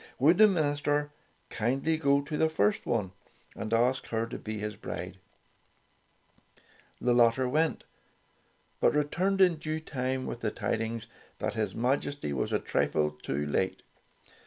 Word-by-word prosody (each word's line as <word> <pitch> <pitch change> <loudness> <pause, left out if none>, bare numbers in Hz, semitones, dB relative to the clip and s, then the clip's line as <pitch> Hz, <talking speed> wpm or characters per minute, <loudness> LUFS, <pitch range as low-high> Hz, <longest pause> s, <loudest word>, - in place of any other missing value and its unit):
Would 160 +8 +4
the 215 - +9
minister 145 -4 0 0.4
kindly 135 +8 0
go 140 -2 +3
to 150 +1 -5
the 160 +1 +2
first 105 -9 +1
one 105 -6 0 0.4
and 110 - -5
ask 125 +3 +2
her 115 0 -1
to 115 - -7
be 110 0 -5
his 105 0 -4
bride? - - -6 1.8
The 125 - +2
latter 120 +2 +4
went, 155 +5 +1 1.0
but - - +3
returned 185 +7 +1
in 180 -3 +5
due 155 0 -3
time, 130 -3 -3
with - - -5
the 110 - 0
tidings 115 +1 -2 0.3
that - - -2
his 110 -3 -2
Majesty 130 - -1
was 65 - -1
a - - +3
trifle 75 -1 0
too 75 -1 -3
late. 95 +6 -1
130 Hz, 145 wpm, -29 LUFS, 110-150 Hz, 1.8 s, the